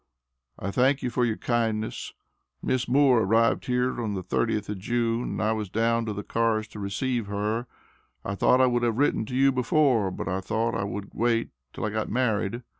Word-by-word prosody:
I 100 - -4
thank 135 +5 +2
you 125 - -1
for 125 +1 +1
your 110 -2 -1
kindness. 110 -2 -2 0.5
Miss 130 -1 0
Moore 130 -1 +4
arrived 115 +3 +2
here 125 0 0
on 105 -3 -2
the 95 - -4
30th 105 +3 -1
of 105 -2 -4
June 115 +2 0
and - - -3
I 110 - +2
was 110 -3 -2
down 115 +2 +1
to 105 - -2
the 105 0 -5
cars 115 -1 0
to 105 - -10
receive 115 +3 -2
her. 105 +4 -2 0.6
I 100 - -2
thought 125 +6 +3
I - - +6
would 120 -1 +1
have 115 -2 0
written 140 -5 +1
to 125 - -5
you 135 +1 +4
before, 125 -4 +2
but 90 - -5
I 95 +2 -1
thought 115 +3 -1
I 100 - -1
would 100 0 -6
wait 115 0 +1 0.2
till - - -4
I 105 - -2
got 110 0 -2
married. 120 -1 0
115 Hz, 205 wpm, -26 LUFS, 105-125 Hz, 0.6 s, I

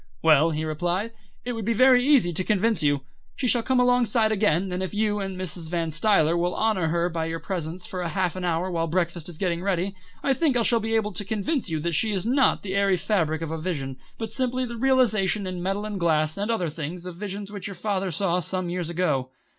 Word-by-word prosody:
"Well," 155 +1 +5
he 155 0 -2
replied, 175 +7 -1 0.3
"it 245 - -2
would 225 -1 -4
be 230 +3 +1
very 255 +2 +5
easy 255 -11 +4
to 185 - +1
convince 215 0 +1
you. 145 -2 +2 0.3
She 265 - -3
shall 240 0 +4
come 260 +2 +1
alongside 245 -3 +3
again, 195 -3 +1
and 180 +1 -2
if 190 +2 -3
you 210 -1 +1
and 195 -2 -4
Mrs. 170 -3 -4
Van 165 -2 -1
Stuyler 165 -1 +3
will 175 +1 0
honour 215 -6 +1
her 170 +2 +1
by 165 -2 -2
your 165 0 -3
presence 175 0 -4
for 190 -5 -5
half 180 +1 -1
an 185 - -5
hour 175 +1 0
while 165 -1 -1
breakfast 170 0 -1
is 170 - -9
getting 175 -2 -1
ready, 190 0 -1 0.3
I 275 - +3
think 275 -2 +1
I 235 - +2
shall 235 +1 +3
be 225 +1 -1
able 210 -2 0
to 190 - -4
convince 220 - -1
you 160 -1 -1
that 170 +2 -1
she 215 +7 +1
is 190 0 0
not 265 +3 +3
the 190 -2 -4
airy 200 -1 +3
fabric 165 -4 0
of 160 - -4
a 160 -1 -4
vision, 140 -7 -3 0.2
but 225 - -5
simply 255 -1 0
the 235 -1 -6
realisation 225 -6 +2
in 185 -1 -4
metal 195 +3 -2
and 210 -2 -4
glass 155 -2 +2
and 205 +2 -3
other 185 -8 0
things 165 +3 -6
of 180 -2 -6
visions 200 0 -5
which 205 -1 -5
your 200 - -7
father 195 0 -1
saw 180 +1 +1
some 180 0 -1
years 175 -2 -3
ago." 150 -7 0
185 Hz, 235 wpm, -25 LUFS, 170-215 Hz, 0.3 s, Well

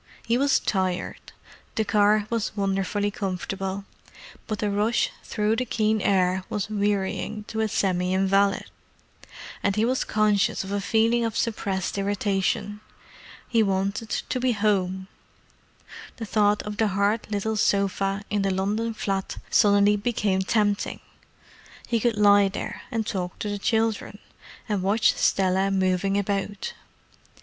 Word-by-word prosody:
He 230 - +2
was 275 +2 +3
tired; 185 -3 -2 0.4
the 220 - +1
car 210 0 +3
was 225 -2 -2
wonderfully 195 +1 0
comfortable, 195 0 -4 0.6
but 215 - -2
the 205 0 -1
rush 215 +3 +1
through 215 +1 0
the 255 - 0
keen 220 -2 +1
air 185 -1 +2
was 205 0 -3
wearying 205 +1 -1
to 220 - -4
a 220 - +2
semi 185 -3 0
invalid, 195 +1 +2 1.0
and 200 -1 +1
he 215 +1 +2
was 255 +2 +1
conscious 210 -2 +1
of 190 - -7
a 200 0 -1
feeling 230 +3 +2
of 225 -2 -2
suppressed 200 -4 -2
irritation. 205 +1 -1 0.7
He 230 - +2
wanted 200 +2 -1
to 255 - -2
be 250 -1 +2
home. 190 -3 0 1.1
The 225 - -5
thought 210 -1 +2
of 210 0 -6
the 220 - +2
hard 200 +3 0
little 215 +1 -1
sofa 200 -1 +1
in 205 -1 +1
the 195 - +1
London 210 +4 -1
flat 195 -2 -3
suddenly 205 0 +5
became 205 -3 0
tempting—he 210 +3 -3
could 230 -1 0
lie 205 -1 +6
there 195 - -5
and 225 -3 -2
talk 180 -3 -3
to 210 - -4
the 205 0 -3
children, 220 -1 0 0.5
and 205 -4 -1
watch 205 +4 +3
Stella 190 0 +2
moving 190 0 +1
about. 200 0 -2
205 Hz, 140 wpm, -25 LUFS, 195-215 Hz, 1.1 s, lie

